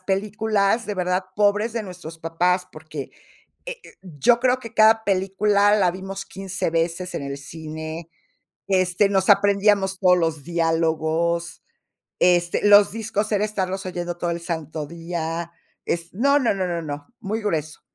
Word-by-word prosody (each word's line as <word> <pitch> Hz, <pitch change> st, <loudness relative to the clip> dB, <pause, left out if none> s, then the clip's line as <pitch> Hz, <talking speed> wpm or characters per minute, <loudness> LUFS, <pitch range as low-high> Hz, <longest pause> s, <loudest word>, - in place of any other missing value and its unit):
películas, 205 Hz, +3 st, 0 dB
de 210 Hz, -, -3 dB
verdad, 180 Hz, 0 st, 0 dB
pobres 210 Hz, +2 st, +2 dB
de 230 Hz, -, -1 dB
nuestros 175 Hz, -4 st, -9 dB
papás, 180 Hz, +3 st, 0 dB
porque, 155 Hz, -3 st, -8 dB, 0.6 s
eh -, -, -6 dB
eh, -, -, -15 dB
yo 185 Hz, -, +2 dB
creo 255 Hz, 0 st, +3 dB
que 230 Hz, -2 st, -10 dB
cada 220 Hz, 0 st, +5 dB
película 200 Hz, +1 st, +2 dB
la 195 Hz, -4 st, +3 dB
vimos 190 Hz, +2 st, -7 dB
15 195 Hz, -1 st, -4 dB
veces 170 Hz, +2 st, -1 dB
en -, -, -4 dB
el 140 Hz, 0 st, -5 dB
cine, 160 Hz, +2 st, -7 dB, 0.6 s
este, 185 Hz, +1 st, +2 dB
nos 190 Hz, 0 st, +1 dB
aprendíamos 200 Hz, -1 st, +3 dB
todos 180 Hz, -1 st, +5 dB
los 160 Hz, -4 st, -1 dB
diálogos, 165 Hz, 0 st, 0 dB, 0.6 s
este, 175 Hz, -1 st, +3 dB
los 205 Hz, 0 st, +7 dB
discos 215 Hz, -1 st, -2 dB
era 205 Hz, 0 st, +2 dB
estarlos 190 Hz, -2 st, -3 dB
oyendo 175 Hz, -1 st, -4 dB
todo 175 Hz, 0 st, -1 dB
el 170 Hz, 0 st, -3 dB
santo 160 Hz, -3 st, -4 dB
día. 170 Hz, 0 st, -4 dB, 0.4 s
Es, 170 Hz, 0 st, -2 dB
no, 280 Hz, +8 st, +3 dB
no, 250 Hz, -7 st, +2 dB
no, 190 Hz, -1 st, -1 dB
no, 170 Hz, -1 st, -2 dB
no, 145 Hz, -2 st, -6 dB
muy 215 Hz, +1 st, -3 dB
grueso. 160 Hz, -7 st, -3 dB
185 Hz, 155 wpm, -23 LUFS, 165-205 Hz, 0.6 s, los